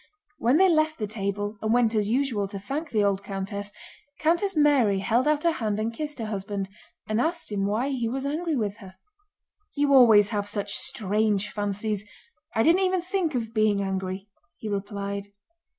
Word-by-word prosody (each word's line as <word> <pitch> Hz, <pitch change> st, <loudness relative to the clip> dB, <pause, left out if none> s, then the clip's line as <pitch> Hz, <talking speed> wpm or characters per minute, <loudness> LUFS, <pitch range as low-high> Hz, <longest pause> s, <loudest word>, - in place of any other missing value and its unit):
When 255 Hz, +1 st, +3 dB
they 380 Hz, +2 st, +6 dB
left 315 Hz, -2 st, +2 dB
the 215 Hz, -, -2 dB
table 205 Hz, 0 st, -3 dB
and 220 Hz, -, 0 dB
went 235 Hz, -1 st, +3 dB
as 210 Hz, -2 st, +1 dB
usual 240 Hz, -5 st, 0 dB
to 200 Hz, 0 st, -7 dB
thank 280 Hz, +10 st, -4 dB
the 215 Hz, -2 st, +1 dB
old 200 Hz, -1 st, +1 dB
countess, 200 Hz, +1 st, -4 dB, 0.5 s
Countess 340 Hz, +4 st, +1 dB
Mary 275 Hz, -9 st, +4 dB
held 230 Hz, +8 st, +1 dB
out 300 Hz, -1 st, +2 dB
her 340 Hz, -, +4 dB
hand 215 Hz, -8 st, -2 dB
and 225 Hz, +2 st, -1 dB
kissed 300 Hz, +3 st, -5 dB
her 225 Hz, -, -3 dB
husband, 200 Hz, -2 st, -4 dB, 0.4 s
and 215 Hz, +2 st, +1 dB
asked 335 Hz, -4 st, -1 dB
him 200 Hz, -1 st, 0 dB
why 225 Hz, +7 st, 0 dB
he 245 Hz, -4 st, -1 dB
was 265 Hz, +3 st, -3 dB
angry 315 Hz, +3 st, -1 dB
with 210 Hz, -4 st, -2 dB
her. 190 Hz, -4 st, -12 dB, 0.8 s
"You 285 Hz, -1 st, +2 dB
always 220 Hz, -6 st, +7 dB
have 205 Hz, -2 st, -2 dB
such 205 Hz, -1 st, -3 dB
strange 210 Hz, -1 st, 0 dB
fancies! 205 Hz, 0 st, -2 dB, 0.5 s
I 225 Hz, -, +3 dB
didn't 340 Hz, +7 st, +4 dB
even 370 Hz, -2 st, +1 dB
think 365 Hz, -5 st, -1 dB
of 225 Hz, -2 st, -3 dB
being 215 Hz, -2 st, +2 dB
angry," 190 Hz, 0 st, -3 dB, 0.3 s
he 220 Hz, -, -7 dB
replied. 200 Hz, 0 st, -3 dB
220 Hz, 180 wpm, -26 LUFS, 200-280 Hz, 0.8 s, always